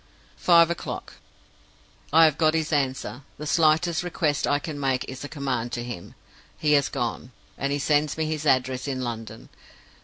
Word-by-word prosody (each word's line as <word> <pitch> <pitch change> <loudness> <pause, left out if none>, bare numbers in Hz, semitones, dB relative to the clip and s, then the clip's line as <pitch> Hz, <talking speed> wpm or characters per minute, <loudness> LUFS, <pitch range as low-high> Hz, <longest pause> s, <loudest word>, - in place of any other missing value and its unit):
"Five 170 -1 +5
o'clock. 170 - -5 1.0
I 165 +2 +7
have 155 -1 +1
got 155 0 +3
his 160 0 -1
answer. 135 -2 -1 0.2
The 150 - -7
slightest 160 +2 +3
request 160 -5 0
I 145 - +3
can 145 0 -6
make 135 -2 0
is 130 +1 -7
a 145 - -6
command 130 -5 -3
to 120 -1 -2
him. 120 -8 -8 0.4
He 150 - +1
has 140 -2 +3
gone; 125 -1 -4 0.2
and 140 +1 -2
he 145 - +1
sends 150 +1 +1
me 160 - 0
his 155 -1 -3
address 130 0 +1
in 130 -2 -2
London. 115 -2 -6
145 Hz, 175 wpm, -25 LUFS, 130-155 Hz, 1.0 s, I